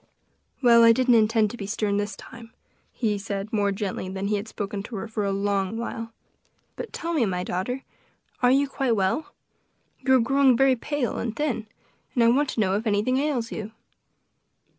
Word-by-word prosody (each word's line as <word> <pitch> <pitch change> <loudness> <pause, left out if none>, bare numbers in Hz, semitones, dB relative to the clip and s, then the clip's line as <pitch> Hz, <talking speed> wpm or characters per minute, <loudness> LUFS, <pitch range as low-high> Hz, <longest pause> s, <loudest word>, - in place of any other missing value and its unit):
"Well, 235 -1 +7
I 230 0 +8
didn't 255 +1 +3
intend 220 -1 +3
to 240 - -8
be 200 - -6
stern 205 -1 -1
this 205 +1 -2
time," 230 -1 -12 0.4
he 210 -4 -1
said 200 +2 -5
more 205 -2 +2
gently 195 -1 -3
than 195 +1 -3
he 210 - +1
had 205 +2 -5
spoken 205 -2 -4
to 220 +3 -8
her 205 +3 -4
for 215 -1 -3
a 200 - 0
long 200 +1 -1
while; 230 -1 -5 0.6
"but - - -7
tell 340 0 -4
me, 300 -7 +2
my 180 -1 -2
daughter, 245 +10 -3 0.6
are 245 - +5
you 275 +2 +3
quite 265 -3 0
well? 195 +10 0 0.7
you 265 -1 +3
are - - +5
growing 265 +1 +4
very 270 0 +4
pale 270 +1 -2
and 225 -1 -3
thin, 245 -7 -2 0.5
and 240 - +4
I 230 - +6
want 275 +4 +2
to - - -3
know 190 -3 +2
if 220 +3 -2
anything 215 +5 +1
ails 270 -5 -1
you." 220 0 -6
225 Hz, 195 wpm, -25 LUFS, 205-250 Hz, 0.7 s, I